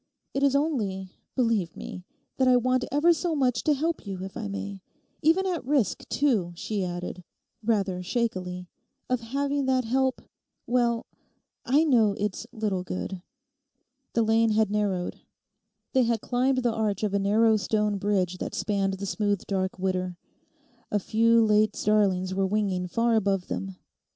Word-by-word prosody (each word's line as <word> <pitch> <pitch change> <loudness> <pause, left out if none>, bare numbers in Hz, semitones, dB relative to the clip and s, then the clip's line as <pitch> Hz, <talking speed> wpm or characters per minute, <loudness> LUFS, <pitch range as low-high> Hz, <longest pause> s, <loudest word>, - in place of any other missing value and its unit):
It 275 - -1
is 280 -1 +3
only, 210 - -1 0.2
believe 225 -9 +1
me, 180 - -7 0.3
that 260 - +3
I 250 -1 +6
want 255 +1 +1
ever 305 +5 +4
so 335 -1 -1
much 250 -5 +1
to 300 - +4
help 320 -4 -2
you, 190 -1 -5
if 195 - -7
I - - -4
may—even 100 - -2
at 360 -3 -1
risk, 260 -9 0
too,' 220 -12 +1
she 200 +3 -2
added, 180 0 -5 0.4
rather 200 -5 0
shakily, 180 -4 -2 0.4
'of 255 - +2
having 275 +4 -1
that 260 -2 +2
help—well—I 250 +2 -2
know 230 -9 +4
it's 210 +2 -3
little 210 -6 -2
good.' 185 0 -5 0.9
The 230 - +3
lane 225 +1 +3
had 215 -1 +2
narrowed. 200 -4 -1 0.7
They 260 - +4
had 230 -2 +1
climbed 255 +1 +1
the 240 -2 +2
arch 215 -2 -1
of 205 -2 0
a 200 - +2
narrow 220 +3 +4
stone 210 -1 0
bridge 185 -3 0
that - - -4
spanned 195 0 0
the 195 +1 -5
smooth 205 0 -1
dark 190 -1 -2
Widder. 185 -1 -2 0.7
A 210 - +1
few 230 +3 +3
late 215 0 +3
starlings 195 -3 +2
were 195 0 +1
winging 190 -3 0
far 230 +5 +1
above 195 -4 +1
them. 195 -1 -4
215 Hz, 150 wpm, -27 LUFS, 190-250 Hz, 0.9 s, I